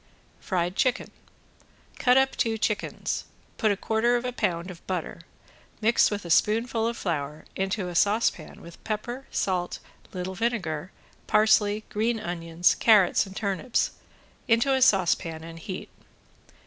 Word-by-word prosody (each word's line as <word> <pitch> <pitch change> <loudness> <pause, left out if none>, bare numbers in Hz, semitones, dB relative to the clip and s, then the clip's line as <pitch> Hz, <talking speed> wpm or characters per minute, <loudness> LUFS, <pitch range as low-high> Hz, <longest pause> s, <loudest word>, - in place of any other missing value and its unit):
~FRIED 180 -2 -1
CHICKEN~ 255 +3 0 0.9
Cut 250 0 +4
up 265 0 +3
two 225 -1 0
chickens. 210 -1 -2 0.3
Put 215 - +3
a 200 - -1
quarter 225 +4 +1
of 240 +1 -1
a 250 - -1
pound 175 -4 -1
of 175 - -13
butter, 180 -2 -4 0.6
mixed 225 +2 +4
with 205 -3 -4
a 170 - -4
spoonful 225 +4 +2
of 235 0 -3
flour, 150 -4 -3
into 190 0 -1
a 175 - -5
saucepan 200 -3 0
with 170 0 -13
pepper, 240 +5 -4
salt, 180 -2 -1 0.3
little 185 0 -4
vinegar, 185 -6 -2 0.4
parsley, 210 0 +3
green 225 +2 0
onions, 175 -3 +1
carrots 210 -2 +4
and 190 - -11
turnips, 205 +4 -1 0.6
into 235 +3 +3
a 265 - +1
saucepan 175 -7 +2
and 165 0 -9
heat. 185 +3 -7
205 Hz, 140 wpm, -26 LUFS, 175-230 Hz, 0.9 s, Cut